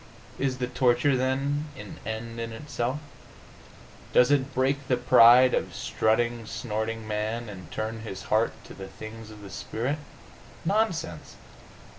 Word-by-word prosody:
Is 135 -2 0
the 125 - -1
torture, 125 +2 +3
then, 135 +3 0
an 105 -1 -9
end 115 +1 -5
in 115 0 -4
itself? 125 +1 -3 1.2
Does 125 +2 +6
it 140 -1 +2
break 135 +1 +1
the 125 - +2
pride 125 +1 +7
of - - -1
strutting, 115 +1 0
snorting 110 -1 -3
man, 110 +2 -2
and 90 -5 -9
turn 110 +3 -3
his 100 -3 -7
heart 110 +2 +2
to - - -11
the 95 0 -8
things 110 +2 -9
of 105 -1 -12
the 100 - -9
spirit? 130 +7 -3 0.7
Nonsense! 170 - -1
120 Hz, 140 wpm, -27 LUFS, 110-130 Hz, 1.2 s, pride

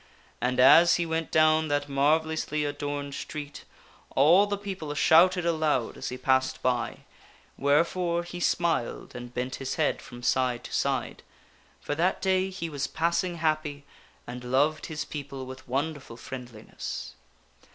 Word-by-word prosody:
And 125 0 0
as 165 +7 +7
he 170 - 0
went 160 0 -2
down 155 0 +4
that 145 -1 0
marvellously 150 +2 +1
adorned 145 -1 -4
street, 145 0 -7 0.5
all 170 +9 +6
the 205 0 -2
people 190 -7 -6
shouted 175 +3 +5
aloud 155 -7 0
as - - -5
he 125 - -5
passed 130 0 +1
by, 125 -2 -1 0.5
wherefore 170 +4 +1
he 175 +1 -8
smiled 170 -8 -1
and 125 0 -8
bent 125 +1 -3
his 135 0 -4
head 155 - 0
from 120 -1 -11
side 125 -2 +1
to - - -9
side; - - -1 0.6
for - - -3
that 175 +5 +1
day 190 0 +1
he 185 -3 -5
was 145 -3 -3
passing 170 +3 0
happy 155 -3 -1 0.4
and 125 +1 -7
loved 145 +5 +1
his 150 -2 -4
people 140 -3 -7
with 130 0 -10
wonderful 135 -2 -3
friendliness. 120 -3 -7
150 Hz, 145 wpm, -27 LUFS, 130-165 Hz, 0.6 s, as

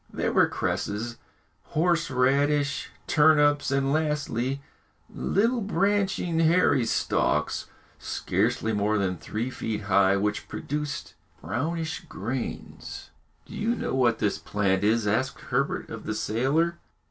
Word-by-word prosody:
There - - -1
were - - +5
cresses, 115 +3 -2 0.6
horse 170 0 +2
radish, 140 +3 +1 0.2
turnips, 145 -2 +4
and 135 0 +1
lastly, 145 -4 -1 0.5
little 230 +4 0
branching 195 -3 +1
hairy 160 -6 +4
stalks, 75 -8 0 0.3
scarcely 110 - -1
more 105 +1 +1
than 95 -2 0
three 115 +9 -4
feet 110 -4 -3
high, 100 0 +3
which 105 +1 -1
produced 150 0 -4 0.3
brownish 160 - -2
grains. 130 -5 -6 0.3
"Do - - -12
you 230 +3 0
know - - -3
what 120 -4 +3
this 105 - 0
plant 100 -1 0
is?" 110 +1 +2
asked 115 +6 0
Herbert - - -2
of - - -7
the - - -1
sailor. 150 +10 0
135 Hz, 120 wpm, -26 LUFS, 110-160 Hz, 0.6 s, were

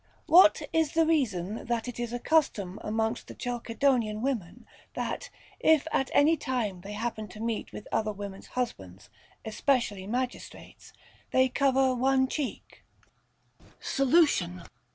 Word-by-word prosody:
What 320 -2 +6
is 320 -2 +1
the 325 0 +3
reason 220 - -1
that 235 0 -1
it 245 - -6
is 240 -1 -3
a 245 - -2
custom 225 - +1
amongst 220 +2 -2
the - - -10
Chalcedonian 240 -2 0
women, 235 -11 -3 0.3
that, - - -4 0.3
if 315 -2 +4
at 270 - 0
any 305 +3 +5
time 240 - -3
they 200 +3 -8
happen 215 0 -4
to 210 +2 -12
meet 225 0 -3
with 210 - -9
other 215 -1 0
women's 200 -1 -8
husbands, 95 - -4 0.3
especially 220 -4 0
magistrates, 250 +3 -5 0.4
they 260 0 +3
cover 265 -1 +2
one 260 +1 +2
cheek 280 0 -5 0.5
\ - - -29
Solution. 265 - +2
240 Hz, 135 wpm, -28 LUFS, 210-270 Hz, 0.5 s, What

